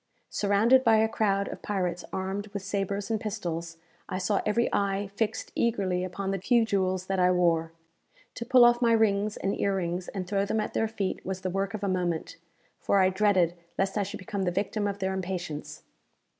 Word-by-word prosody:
Surrounded 215 +6 +4
by 225 -3 +5
a 220 0 +4
crowd 200 -3 0
of - - -8
pirates 180 -4 -2
armed 190 +2 -3
with 200 -2 -6
sabres 200 +1 -2
and 220 -1 0
pistols, 170 -6 -4 0.3
I - - -2
saw 195 +2 0
every 230 +3 +2
eye 200 0 0
fixed 220 +1 -2
eagerly 195 -6 0
upon 190 +1 -3
the 195 - -2
few 235 +2 +3
jewels 185 -3 0
that 190 0 -1
I 180 0 +4
wore. 170 -2 +2 0.6
To - - -5
pull 250 0 +6
off 240 0 +4
my 235 -1 +4
rings 215 -2 +2
and 195 - -1
ear 200 -1 +1
rings, 175 -1 -2
and 190 -3 -4
throw 200 0 +1
them 210 +2 -1
at 215 - -3
their 225 - +1
feet, 205 -3 -3
was 190 0 -4
the 185 -1 -2
work 195 +2 -1
of 210 - -6
a - - +1
moment, 175 -4 -2 0.4
for 200 - +1
I 185 -1 +5
dreaded 190 -3 +3 0.2
lest 195 0 0
I 210 - +1
should 200 +2 -4
become 205 -3 -4
the 185 - +1
victim 205 +3 -1
of 200 -1 -3
their 190 -1 -1
impatience. 175 -5 -5
195 Hz, 205 wpm, -28 LUFS, 185-210 Hz, 0.6 s, pull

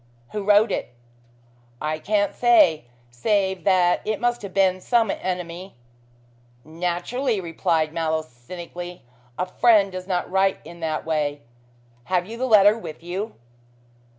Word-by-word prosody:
"Who 210 -1 -3
wrote 210 +2 +4
it?" - - -4 0.8
"I 155 +1 -2
can't 205 +3 0
say, 220 - +4 0.3
save 190 - 0
that 180 -2 +3
it 215 0 -2
must 240 0 0
have 200 - -7
been 185 -1 +2
some 230 0 +2
enemy." 180 0 -5 0.9
"Naturally," 180 - -2
replied 165 -2 -1
Mallow 160 -1 -1
cynically. 175 +7 -9 0.3
"A 180 - 0
friend 200 +1 +4
does 185 0 -7
not 180 -2 -2
write 190 0 +2
in 170 +2 -11
that 160 -2 -3
way. 150 -2 -1 0.6
Have 180 +3 0
you 220 +4 -8
the 255 +2 -2
letter 210 -2 +6
with 165 -8 -9
you." 190 +6 -4
185 Hz, 135 wpm, -23 LUFS, 165-205 Hz, 0.9 s, letter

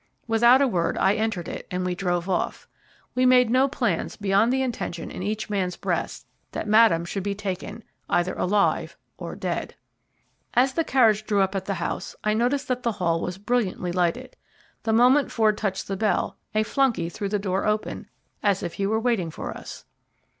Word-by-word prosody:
Without 240 +4 +5
a - - +3
word 175 -8 0
I 195 - +3
entered 210 -6 -2
it, - - -7
and 180 0 -2
we 180 - 0
drove 175 -1 -1
off. 185 -2 -2 0.5
We 255 - +1
made 250 -2 +5
no 260 +2 +4
plans 240 - -1
beyond 205 +3 +2
the 265 0 +1
intention 200 -9 -4
in - - -7
each 215 +3 -2
man's 185 -4 -2
breast - - -3 0.3
that - - -4
Madame 210 -6 +5
should 195 +3 -3
be 200 +1 -2
taken 205 +2 -5 0.3
either 175 +1 +1
alive 200 +2 +1 0.2
or - - -6
dead. - - -3 0.8
As 260 +2 +4
the 330 - +1
carriage 220 -7 +3
drew 205 -2 +2
up 190 0 +1
at 195 -1 -3
the 195 - -2
house 170 - -4
I 215 - +2
noticed 250 +6 0
that 250 0 0
the 235 -2 0
hall 170 -4 0
was 180 +1 -4
brilliantly 205 -4 -1
lighted. 175 -1 -1 0.5
The 225 - -1
moment 250 +5 +4
Ford 220 -2 +3
touched 200 -3 -3
the 195 - -2
bell 210 +2 0 0.2
a 215 - +3
flunkey 235 -7 +1
threw 200 +3 -4
the 210 - +1
door 195 -1 -1
open, 210 0 -2 0.3
as 200 -2 +1
if 175 - -4
he 195 - -1
were 220 +2 +1
waiting 225 -8 0
for - - -6
us. - - -10
210 Hz, 190 wpm, -25 LUFS, 185-235 Hz, 0.8 s, Without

